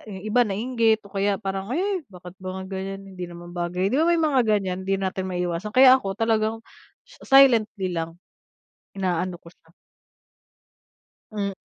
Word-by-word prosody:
yung 190 0 -8
iba 215 +3 +2
nainggit 225 +1 +1
o 200 - -16
kaya 200 0 +1
parang, 195 0 -4
"Ay 375 +6 -1
bakit 180 -2 -12
ba 190 0 -6
ganyan 195 +1 -6
hindi 180 -2 -8
naman 175 0 -11
bagay" 180 +3 -2
'di 275 - +2
ba, 330 - +3
may 345 - +4
mga 300 -5 +2
ganyan 190 -3 +1
hindi 195 +1 0
natin 190 0 -3
maiiwasan. 180 +2 -3
Kaya 260 0 +9
ako 195 -4 -4
talagang 225 0 +1 0.5
sa 380 - 0
silently 220 -8 +4
lang, 165 0 -4 0.8
inaano 180 -1 -1
ko 170 0 -16
siya. 165 -1 -29 1.6
Hmm. 200 -2 -2
195 Hz, 160 wpm, -24 LUFS, 185-225 Hz, 1.6 s, Kaya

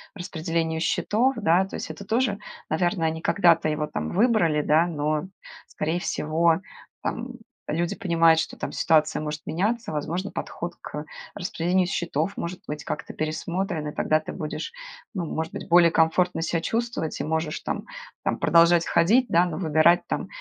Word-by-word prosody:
распределению 165 -2 -2
счетов, 235 +9 +1
да. 185 -2 +3
То 195 - -8
есть - - -5
это 200 - -9
тоже, 225 -1 +1 0.3
наверно, 175 +1 +1
они 160 0 -1
когда-то 170 -5 +3
его, 150 0 -1
там, - - -4
выбрали, 190 -8 +3
да. 160 +4 +3
Но, 155 0 -1 0.4
скорее 160 +3 -2
всего, 165 +1 +1 0.4
там - - -3 0.4
люди 170 +5 -1
понимают, 165 -4 +4
что - - -6
там - - -5
ситуация 155 -1 +2
может 150 0 -4
меняться, 210 +4 -1
возможно, 170 +7 -3
подход 170 - -5
к 150 +1 -6 0.3
распределению 180 0 0
счетов 170 0 -1
может 175 +2 -5
быть 150 0 -5
как-то - - -5
пересмотрен. 160 +1 -2
И 150 - -5
тогда 155 - +2
ты 155 - -7
будешь, 155 - -5 0.4
ну, 185 -5 -2
может 160 +1 -4
быть, - - -7
более 170 0 +7
комфортно 165 +1 +2
ся 165 0 0
чувствовать 230 -4 -2
и - - -2
можешь 160 +1 -2
там - - -4 0.4
там - - 0
продолжать 170 0 +5
ходить, 235 +9 +3
да. 170 +2 +4
Но 175 -3 -4
выбирать 160 0 +4
там - - -2
170 Hz, 160 wpm, -25 LUFS, 155-185 Hz, 0.4 s, более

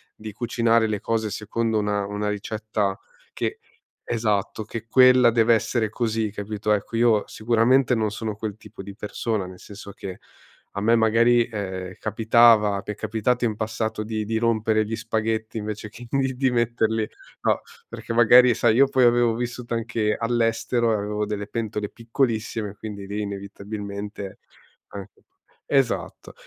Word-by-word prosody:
di 110 0 -8
cucinare 115 0 +1
le 105 -2 -2
cose 110 -1 -1
secondo 110 +2 -2
una 105 -1 0
una 105 +1 -3
ricetta 105 -1 -2 0.4
che - - -3 0.5
esatto, 110 -2 -1
che 115 +2 -7
quella 125 0 +6
deve 115 0 +4
essere 110 0 0
così, 110 -2 -1
capito? 105 +1 -3
Ecco, 105 +2 -3
io 115 -2 +3
sicuramente 120 +3 +2
non 110 -3 +1
sono 110 0 -4
quel 105 -1 -5
tipo 105 -2 -12
di 100 0 -9
persona, 105 -1 -3
nel 90 0 -11
senso 100 0 -10
che 95 -1 -8 0.5
a 100 - -4
me 115 +2 +4
magari, 115 +1 +4
ehm, 95 -4 -5
capitava 110 -1 +4
mi - - -5
è - - -13
capitato 115 +3 0
in 110 - -1
passato 110 0 -3
di 110 0 -3
di 110 +1 -1
rompere 110 -1 +2
gli 110 +1 -3
spaghetti 110 0 -2
invece 105 0 -5
che 120 +3 -12
in 135 - 0 0.2
di 130 +1 +2
metterli, 115 -2 0 0.3
no, - - +1 0.3
perché - - -8
magari 120 +1 +6
sai 110 0 +3
io 135 +1 +6
poi 130 -2 +3
avevo 120 -1 +4
vissuto 120 0 -4
anche 115 -2 -1
all'estero 115 0 0
e 110 - +2
avevo 105 +1 -2
delle 105 -1 -3
pentole 105 -2 -3
piccolissime, 115 -3 -2
quindi 100 -2 -7
lì 100 +2 -4
inevitabilmente, 100 0 -6 0.5
anche 100 -2 -10 0.5
esatto. 135 -4 -1
110 Hz, 155 wpm, -24 LUFS, 105-115 Hz, 0.5 s, quella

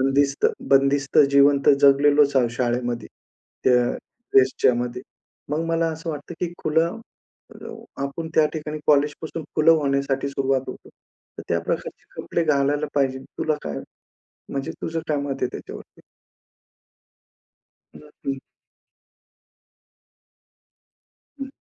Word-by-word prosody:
बंदिस्त 140 +1 +2 0.2
बंदिस्त 135 0 +3
जीवन 140 0 +5
तर - - +8
जगलेलोचं 140 0 +5
आहोत 120 -2 +1
शाळेमध्ये. 120 0 -2 0.6
त्या 125 -1 +3 0.4
फेजचामध्ये. 125 -2 +2 0.5
मग 155 +2 -1
मला 165 0 +1
असं 160 +1 -5
वाटतं, 150 +3 -7
की 175 -1 -2
खुलं, 165 +8 +1 0.5
अ - - -10 0.3
आपण 140 +4 -4
त्या 155 -1 +5
ठिकाणी 155 -1 -5
कॉलेजपासून 150 +2 +1
खुलं 155 +1 +5
होण्यासाठी 140 0 0
सुरुवात 135 -1 0
होतो. - - -9 0.5
तर - - -5
त्या - - +1
प्रकारचे - - -4 0.2
कपडे 170 - -1
घालायला 145 0 +1
पाहिजे 135 -2 +1
तुला 155 +3 -2
काय 70 -2 -4 0.7
म्हणजे, 135 -1 -4
तुझं 165 0 -2
काय 150 - +1
मत 140 -1 -3
आहे - - +2
त्याच्यावरती? - - -10 2.0
नक्की. 140 -2 -7 3.0
हं. 270 0 -6
140 Hz, 110 wpm, -23 LUFS, 135-155 Hz, 3.0 s, तर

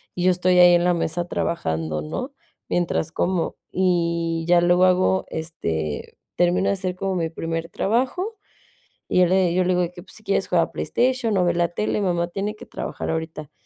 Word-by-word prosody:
y 175 - -2
yo 185 - +5
estoy 180 0 +2
ahí 175 0 +8
en 175 0 +2
la 180 - +4
mesa 170 +1 -2
trabajando, 80 - -2
¿no? 250 - -5 0.4
Mientras 170 -2 0
como. 175 -1 -1
Y 170 -2 0
ya 175 0 +5
luego 175 +1 +4
hago, 185 +1 +2
este, 80 - -4 0.2
termino 180 +2 +2
de - - +2
hacer 185 -2 -3
como 190 0 -2
mi 165 -2 -1
primer 165 0 -4
trabajo, 265 - -1 0.7
y - - +2
yo 180 - +6
le 185 -1 +2
yo 185 - +2
le 180 - -1
digo 180 0 +2
de 175 - -1
que: 180 - -11
"Pues, 190 - -17
si 220 - -15
quieres 195 -1 0
juega 170 -2 +1
PlayStation 245 -4 0
o 180 - +3
ve 175 - +2
la 175 0 +2
tele, 210 +4 -1
mamá 175 -3 0
tiene 205 +4 -3
que - - -12
trabajar - - -5
ahorita". 160 -2 -5
175 Hz, 200 wpm, -23 LUFS, 165-190 Hz, 0.7 s, ahí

